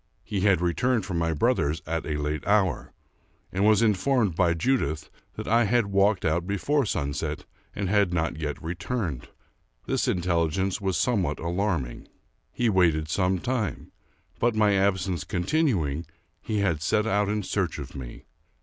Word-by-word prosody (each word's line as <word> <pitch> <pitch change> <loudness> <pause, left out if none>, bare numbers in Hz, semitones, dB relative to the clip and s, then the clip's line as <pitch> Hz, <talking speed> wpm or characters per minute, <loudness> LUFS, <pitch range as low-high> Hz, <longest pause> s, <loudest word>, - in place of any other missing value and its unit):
He 100 - -3
had 95 -3 +3
re 85 -1 +1
turned 125 -3 +1
from 90 -4 -2
my 85 0 +1
brother's 80 - +1
at 80 +1 -3
a 75 -2 -1
late 75 +1 -2
hour, 100 -5 +1 0.6
and 95 +2 0
was 110 +1 +5
informicd 105 -1 +2
by 85 -1 +2
Judith 80 - -1 0.2
that - - -6
I 115 +1 +4
had 115 -2 +1
walked 100 0 +3
out 85 +3 0
before 130 +7 +1
sunset 70 -6 -2 0.3
and 100 - -2
had 100 -1 +2
not 85 -1 0
yet 75 -2 -4
returned. 85 - -3 0.6
This - - 0
intelligence 90 +2 0
was 95 -3 0
somewhat 90 - +1
alarming. 85 -7 -2 0.4
He 120 - 0
waited 85 -7 +2
some 95 +2 +1
time; 120 +2 -3 0.5
but, 120 -1 +2
my 105 -1 +4
absence 95 -4 +1
continuing, 90 - 0 0.3
he 105 -2 -1
had 85 -7 0
set 105 +5 +1
out 105 -2 +1
in 105 0 -1
search - - -1
of - - -7
me. 60 -3 -8
95 Hz, 160 wpm, -26 LUFS, 80-105 Hz, 0.6 s, was